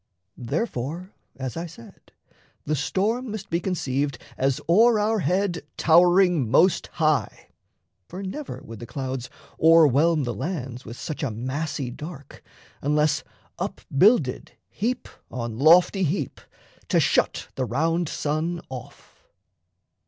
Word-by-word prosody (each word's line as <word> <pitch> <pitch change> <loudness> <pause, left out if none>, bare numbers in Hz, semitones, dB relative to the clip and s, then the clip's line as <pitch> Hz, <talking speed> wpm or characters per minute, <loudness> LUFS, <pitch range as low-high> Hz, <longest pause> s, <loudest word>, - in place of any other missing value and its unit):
Therefore, 160 - -3 0.2
as 130 -2 -5
I 170 +1 -4
said, 155 -8 -15 0.5
The 155 - 0
storm 215 - -1
must 205 -2 -6
be 170 - +1
conceived 140 -7 -1 0.2
as 135 0 0
o'er 220 +7 +5
our 215 +1 +1
head 185 -2 0
Towering 175 - +4
most 170 - +4
high; 155 -4 0 0.6
for 185 +3 -7
never 270 +10 -6
would 115 -1 -10
the 120 - -8
clouds 130 -3 -4 0.3
O'erwhelm 160 -1 +5
the 120 -2 -2
lands 130 - -5
with 115 +2 -8
such 155 +1 -5
a 140 - 0
massy 130 +3 -3
dark, 145 +1 -10 0.4
Unless 150 +1 +1 0.4
up - - -4
builded 170 - +3 0.2
heap 240 +6 -2 0.2
on 115 -2 -5
lofty 175 +6 +6
heap, 155 -5 -1 0.5
To - - +3
shut - - +1
the 130 - -2
round 165 +7 0
sun 155 +4 -2
off. 125 -2 -11
155 Hz, 125 wpm, -24 LUFS, 130-180 Hz, 0.6 s, lofty